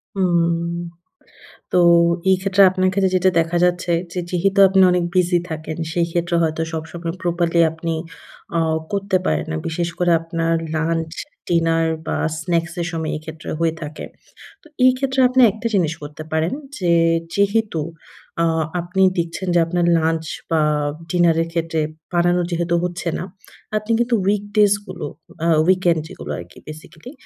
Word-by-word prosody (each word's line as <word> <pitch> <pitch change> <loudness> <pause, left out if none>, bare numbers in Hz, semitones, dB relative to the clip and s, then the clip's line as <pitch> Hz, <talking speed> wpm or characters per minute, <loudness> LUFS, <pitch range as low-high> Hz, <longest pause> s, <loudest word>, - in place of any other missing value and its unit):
হুম, 170 -2 +1 1.0
তো - - +2 0.5
এই 190 - +5
ক্ষেত্রে 195 0 +3
আপনার 185 0 +1
ক্ষেত্রে 190 -1 +1
যেটা 185 +1 +3
দেখা 165 +1 -1
যাচ্ছে, 180 0 +1 0.2
যে 180 - -2
যেহেতু 195 +3 0
আপনি 190 0 +3
অনেক 180 -1 +1
বিজি 180 -1 +3
থাকেন, 155 0 -5 0.2
সেই 170 -1 +1
ক্ষেত্রে 170 0 0
হয়তো 160 0 0
সবসময় 165 +1 -5
প্রপারলি 170 -1 +1
আপনি 160 0 -4 0.6
অ - - +3 0.3
করতে 200 -1 0
পারেন 75 -1 0
না। 80 - -2
বিশেষ 170 +1 -2
করে 175 -1 +2
আপনার 165 0 -1 0.2
লাঞ্চ, 165 0 -1 0.4
ডিনার 165 -1 +2 0.2
বা - - -1 0.2
স্ন্যাকস 170 0 -1
এর 170 - -1
সময়, 160 -1 -3
এক্ষেত্রে 155 0 -8
হয়ে 165 -1 +1
থাকে। 150 0 -6 0.6
তো - - -17 0.2
এই 255 - +7
ক্ষেত্রে 265 0 -1
আপনি 255 +1 +3
একটা 220 +2 -4
জিনিস 165 -5 +2
করতে 150 +1 -8
পারেন, 160 +5 0 0.2
যে 175 -4 +1 0.4
যেহেতু 200 -4 +1 0.6
আ - - +3 0.4
আপনি 180 +3 -2 0.2
দিচ্ছেন 170 +2 -3
যে - - +5
আপনার 175 +1 0
লাঞ্চ 160 0 0 0.3
বা 160 -1 +3 0.5
ডিনার 175 -2 +3
এর 165 - -2
ক্ষেত্রে 165 -1 -1 0.3
বানানো 175 +1 +2
যেহেতু 170 0 0
হচ্ছে 175 -1 -3
না, - - -4 0.5
আপনি 215 +2 -4
কিন্তু 240 0 +2
weekdays 205 0 +3
গুলো, 175 -5 -6 0.4
আ - - +2 0.2
weekend 180 -3 +3
যেগুলো 75 - -8
আরকি, 85 0 -12
বেসিক্যালি 155 - -11
170 Hz, 155 wpm, -20 LUFS, 165-185 Hz, 1.0 s, এই